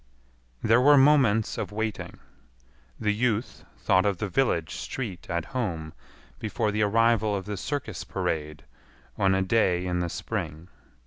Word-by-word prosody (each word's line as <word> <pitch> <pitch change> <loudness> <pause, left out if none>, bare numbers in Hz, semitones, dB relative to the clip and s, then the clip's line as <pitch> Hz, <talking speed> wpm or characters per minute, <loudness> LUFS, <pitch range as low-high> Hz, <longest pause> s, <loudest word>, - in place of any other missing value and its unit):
There 115 +3 +4
were 145 +2 +7
moments 135 -6 +4
of - - -4
waiting. 110 0 -4 0.8
The 105 -1 +1
youth 115 0 -1
thought 95 0 +3
of 100 -3 0
the 105 - -2
village 90 - 0
street 105 -9 -6
at 85 -1 -2
home 85 -11 -3 0.5
before 110 0 -1
the 105 +1 -1
arrival 110 0 +3
of 95 -2 -4
the 105 0 -4
circus 140 +8 -4
parade 75 -3 -3 0.5
on 95 -1 +2
a 95 - +1
day 95 -3 +2
in 90 -1 -1
the 85 -1 -1
spring. 80 +1 -5
105 Hz, 145 wpm, -26 LUFS, 90-115 Hz, 0.8 s, were